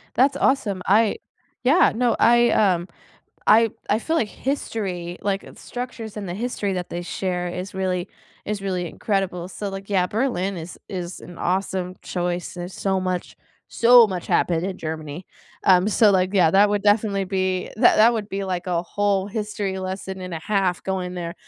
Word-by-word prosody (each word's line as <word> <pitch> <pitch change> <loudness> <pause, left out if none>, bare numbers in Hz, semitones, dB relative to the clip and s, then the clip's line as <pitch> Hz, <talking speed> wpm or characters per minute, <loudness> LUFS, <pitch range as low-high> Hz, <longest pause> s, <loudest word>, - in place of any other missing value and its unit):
That's 270 +3 +3
awesome. 210 -8 +1
I 215 - +3 0.5
Yeah, 295 +8 +5
no, 240 0 +2
I, 240 0 +5
um 180 -4 +2 0.6
I 225 +1 +6 0.2
I 210 - +3
feel 320 +7 -1
like 225 -9 +1
history, 195 -11 -3
like, 195 -1 -1
uh, - - -12
the - - -17
structures 245 -3 -6
and 200 -2 -5
the - - -3
history 205 -2 -2
that 180 -1 -4
they 175 - -4
share 180 0 -3
is 180 +3 -6
really 185 -1 -1 0.4
is 210 -1 -3
really 185 -3 -2
incredible. 185 -2 -2
So 195 +3 -5
like, 195 +1 -8
yeah, 185 -3 +2
Berlin 200 -4 -1
is 170 +2 -8
is 180 -2 -5
an 175 -1 -11
awesome 185 0 -1
choice. 175 -1 -3
There's 175 +1 -7
so 190 -1 0
much 185 -1 -3 0.3
so 240 0 +7
much 185 -3 -5
happened 170 -1 +1
in 190 -1 -4
Germany. 155 +1 -6 0.4
Um, 185 +1 +5
so 215 0 +5
like, 185 0 +2
yeah, 180 -5 +4
that 200 +3 +5
would 205 -1 0
definitely 205 -1 +2
be 185 -1 -1
that - - +6
that 230 +2 +6
would 215 -2 -3
be 195 0 -3
like 180 0 -3
a 170 -2 0
whole 200 +1 0
history 205 -2 -3
lesson 190 0 -5
and 180 -1 -6
a 165 - -4
half 190 -1 0
going 185 -2 -3
there. 170 -1 -4
190 Hz, 185 wpm, -23 LUFS, 180-210 Hz, 0.6 s, so